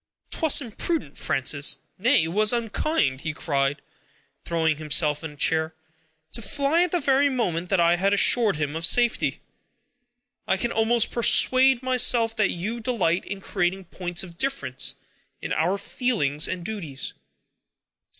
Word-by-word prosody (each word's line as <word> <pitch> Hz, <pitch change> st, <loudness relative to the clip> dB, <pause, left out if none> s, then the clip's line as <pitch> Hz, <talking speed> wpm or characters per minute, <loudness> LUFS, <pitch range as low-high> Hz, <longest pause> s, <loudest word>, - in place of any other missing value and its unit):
"'Twas 315 Hz, -2 st, +3 dB
imprudent, 260 Hz, -, -2 dB
Frances; 140 Hz, +2 st, 0 dB, 0.2 s
nay, 240 Hz, -, +3 dB
it 160 Hz, -, -3 dB
was 210 Hz, +4 st, +2 dB
unkind," 230 Hz, -, -1 dB
he 160 Hz, -, -4 dB
cried, 140 Hz, -2 st, -2 dB, 0.6 s
throwing 160 Hz, -2 st, 0 dB
himself 150 Hz, 0 st, +1 dB
in 160 Hz, -, -5 dB
a 150 Hz, -, -15 dB
chair, 160 Hz, +2 st, -1 dB, 0.6 s
"to 235 Hz, -, -3 dB
fly 285 Hz, +8 st, +1 dB
at 355 Hz, -2 st, +1 dB
the 355 Hz, -, +1 dB
very 280 Hz, -1 st, +2 dB
moment 180 Hz, -10 st, -2 dB
that 195 Hz, -, +1 dB
I 170 Hz, 0 st, +3 dB
had 195 Hz, +2 st, +1 dB
assured 210 Hz, +1 st, +4 dB
him 150 Hz, 0 st, -3 dB
of 165 Hz, -, -5 dB
safety! 240 Hz, +7 st, +2 dB, 1.1 s
I 190 Hz, -, +1 dB
can 235 Hz, +5 st, -2 dB
almost 225 Hz, +1 st, +1 dB
persuade 255 Hz, +2 st, +4 dB
myself 245 Hz, -3 st, +3 dB
that 215 Hz, -, +2 dB
you 210 Hz, +7 st, -3 dB
delight 215 Hz, -8 st, -1 dB
in 195 Hz, -1 st, -7 dB
creating 190 Hz, -1 st, -2 dB
points 175 Hz, -1 st, -2 dB
of 175 Hz, -2 st, -13 dB
difference 270 Hz, -, -1 dB, 0.4 s
in -, -, -4 dB
our 180 Hz, +5 st, 0 dB
feelings 200 Hz, -, -1 dB
and 180 Hz, -2 st, -5 dB
duties." 165 Hz, -12 st, -5 dB
195 Hz, 150 wpm, -24 LUFS, 160-240 Hz, 1.1 s, assured